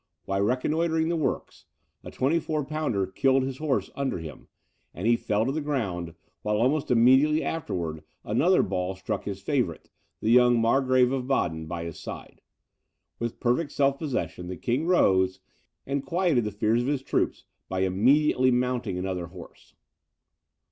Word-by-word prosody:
While 95 0 -1
reconnoitring 160 +8 +1
the 170 - 0
works, 155 - -3 0.4
a - - -8
24 150 +1 0
pounder 150 -10 -1
killed 130 +7 +2
his 130 0 -4
horse 150 -4 -1
under 140 -1 -1
him, 80 -3 -9 0.5
and 90 - -5
he 120 +1 +5
fell 105 -1 0
to 135 - 0
the 155 +3 -2
ground, 95 - -3 0.3
while 105 0 0
almost 135 +6 +1
immediately 130 +6 +4
afterwards 85 - -3 0.2
another 165 - +3
ball 95 0 -2
struck 95 - -4
his - - -5
favourite, - - -2 0.3
the 110 - 0
young 120 -1 +5
Margrave 130 +2 +3
of 130 -2 -2
Baden, 80 -12 -1
by 85 +1 -4
his 85 -2 -7
side. - - -9 0.8
With 115 -1 -4
perfect 135 +5 0
self 140 -1 +2
possession 125 - -3
the 90 0 -6
king 125 - -1
rose, 95 - +3 0.5
and 140 0 -2
quieted 165 - +1
the 105 - -2
fears 110 +3 +1
of 120 - -3
his 140 -2 -1
troops - - -1 0.3
by 95 0 -1
immediately 130 +8 +3
mounting 125 -5 0
another 90 -2 -3
horse. 85 0 -14
125 Hz, 155 wpm, -26 LUFS, 95-140 Hz, 0.8 s, he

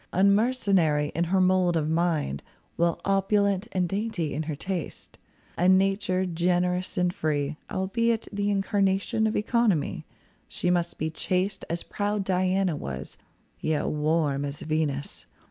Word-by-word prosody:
Unmercenary 195 -7 +3
in 170 +2 0
her 190 +3 +1
mould 185 -2 +3
of 155 -1 0
mind, 160 - 0 0.3
While 170 0 +1
opulent 195 +1 +2
and 180 -1 0
dainty 195 -6 -2
in 145 - -2
her 155 - -2
tastes. 180 +1 -5 0.4
A 180 +2 +4
nature 190 0 +2
generous 180 +2 0
and 180 0 +2
free, 150 -2 -1
albeit 225 +4 0
The 205 0 0
incarnation 200 +2 +1
of 215 - -2
economy. 215 - +1 0.4
She 180 - -1
must 175 -1 0
be 155 +1 -2
chaste 185 +4 -1
as 170 0 -2
proud 205 0 -2
Diana 185 -1 +1
was, 65 - -6 0.4
Yet 155 -1 0
warm 150 -2 +1
as 145 0 -5
Venus. 155 -3 -2
180 Hz, 135 wpm, -26 LUFS, 160-195 Hz, 0.4 s, A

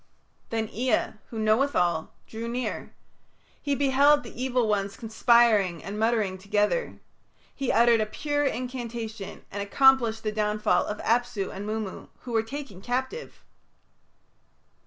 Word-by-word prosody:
Then 225 -1 -1
Ea, 245 +1 0 0.2
who 230 - -7
knoweth 220 +6 +2
all, 170 -3 0
drew 225 +1 -6
near; 245 +2 -4 0.7
he 285 -2 0
beheld 285 +1 +4
the 230 - -10
evil 250 -3 +1
ones 200 -1 -1
conspiring 220 -6 +3
and 205 +2 -5
muttering 220 -4 +1
together. 210 - 0 0.5
He 270 - -1
uttered 235 -1 +5
a 215 - 0
pure 290 +6 -1
incantation 235 -5 -4
and 200 - -4
accomplished 230 +1 +3
the 215 - -1
downfall 210 0 +1
of 210 - -3
Apsu 235 -4 0
and 200 +2 -6
Mummu, 215 -2 -4
who 250 - -8
were 225 -1 +2
taken 235 -5 -8
captive. 260 - -4
225 Hz, 135 wpm, -26 LUFS, 210-255 Hz, 0.7 s, uttered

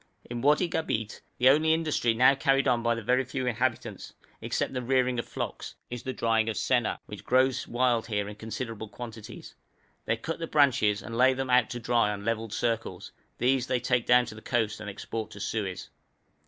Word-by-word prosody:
In 120 0 -5
Wadi 150 +6 +3
Gabeit, 110 -10 -3 0.2
the 125 - +4
only 155 +3 +4
industry 155 -8 0
now 130 +3 +6
carried 135 0 +2
on 120 -2 +2
by 115 0 +1
the 115 - -6
very 125 +4 +2
few 130 0 -4
inhabitants, 125 0 -2 0.3
except - - -2
the 125 - -2
rearing 125 0 +1
of - - -4
flocks, - - -5 0.2
is 120 -1 -5
the 130 - -4
drying 115 -2 +1
of 110 - -3
senna, 120 -3 +1
which 105 - -9
grows 130 +1 +2
wild 120 -2 +1
here 105 -3 -1
in 105 - -6
considerable 110 +1 -6
quantities. 115 -2 -9 0.5
They 115 - 0
cut 165 +9 -5
the 165 - -3
branches 120 -9 +3
and 115 - -7
lay 130 +2 +4
them 135 -1 -3
out 125 -2 +4
to 120 - -5
dry 115 -2 +2
on 100 -1 -5
levelled 115 -1 -2
circles; 115 0 -2 0.3
these 130 +1 +1
they 130 -1 +1
take 125 -1 0
down 125 0 +5
to - - -8
the 110 - -11
coast 110 -4 -1
and 105 -1 -6
export 110 +2 -5
to 100 - -11
Suez. 100 -2 -4
120 Hz, 200 wpm, -28 LUFS, 110-130 Hz, 0.5 s, now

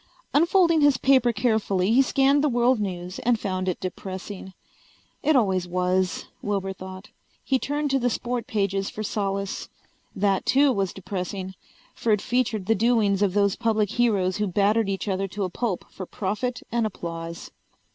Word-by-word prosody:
Unfolding 335 +1 +4
his 290 -3 +5
paper 260 -3 +4
carefully 210 -4 +1
he 250 +4 +6
scanned 275 +2 +3
the 300 - +3
world 245 0 +3
news 180 -2 -4
and 235 -1 +1
found 185 -2 -2
it 180 - -3
depressing. 190 +1 -6 0.7
It 305 +1 +3
always 190 -7 +2
was, 180 +1 0 0.2
Wilbur 195 -2 -2
thought. 185 +1 -10 0.3
He 265 -1 +1
turned 290 +1 -1
to 270 - +2
the 245 0 +1
sport 240 0 -3
pages 195 -2 -1
for 215 - -6
solace. 195 -2 -3 0.5
That 195 -1 +1
too 275 +1 +4
was 195 -6 0
depressing, 190 0 -5 0.4
for 230 - -1
it 210 - +4
featured 225 -4 -1
the 225 - +3
doings 220 -3 +2
of 200 -2 +1
those 200 -1 +3
public 220 -3 0
heroes 205 -6 +1
who 210 0 0
battered 205 +3 +2
each 195 +2 -3
other 195 0 -1
to 200 +2 -4
a 185 - -2
pulp 215 -2 -2
for 185 - -8
profit 220 +5 -3
and 230 -1 +1
applause. 165 -3 -7
205 Hz, 165 wpm, -25 LUFS, 190-240 Hz, 0.7 s, he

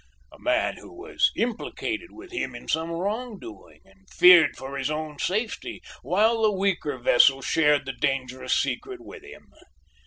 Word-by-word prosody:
"A - - -17
man 315 +2 0
who - - -13
was 365 +2 0
implicated 325 - -3
with 365 +2 -13
him 130 - -4
in 120 - -11
some 160 +1 -1
wrong 210 +7 -3
doing 110 - -13
and 95 0 -25
feared 180 -2 +6
for 135 +1 -7
his 135 0 -2
own 155 -1 -5
safety 220 +4 -3 0.2
while 220 +4 +2
the 215 -1 +4
weaker 190 -8 -1
vessel 130 +2 +4
shared 150 -2 +2
the 135 - -4
dangerous 130 0 -1
secret 390 -2 -3
with 345 - -12
him. 415 +2 -15
175 Hz, 160 wpm, -25 LUFS, -, 0.2 s, feared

